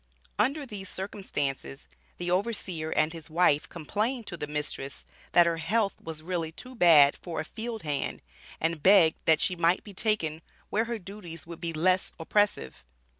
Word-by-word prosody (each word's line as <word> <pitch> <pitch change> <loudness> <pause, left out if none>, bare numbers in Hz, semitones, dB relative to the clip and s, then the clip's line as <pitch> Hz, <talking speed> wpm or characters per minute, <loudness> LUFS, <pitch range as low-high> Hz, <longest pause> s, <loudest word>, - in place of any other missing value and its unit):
Under 280 +7 +1
these 200 -5 -6
circumstances, 140 - -4 0.3
the 175 0 -2
overseer 185 -5 -1
and 155 +1 +1
his 165 -2 -10
wife 160 -2 +3
complained 215 - -2
to 175 - -5
the 150 -3 -5
mistress 150 -2 -4 0.3
that 175 - +7
her 170 -1 +1
health 200 +5 +1
was 160 -1 -6
really 165 -2 -2
too 255 +10 -10
bad 160 - +7
for 170 -2 -4
a 155 - -3
field 225 +4 -5
hand 145 -3 -3 0.4
and 165 -1 -1
begged 185 -2 +6
that 160 -2 +4
she 180 - +1
might 170 +1 +2
be 205 - -10
taken 180 -7 0 0.3
where 220 +2 +2
her 235 0 -3
duties 185 -5 -9
would 170 0 -10
be 170 - -1
less 180 +4 +1
oppressive. 165 - 0
175 Hz, 170 wpm, -28 LUFS, 160-205 Hz, 0.4 s, that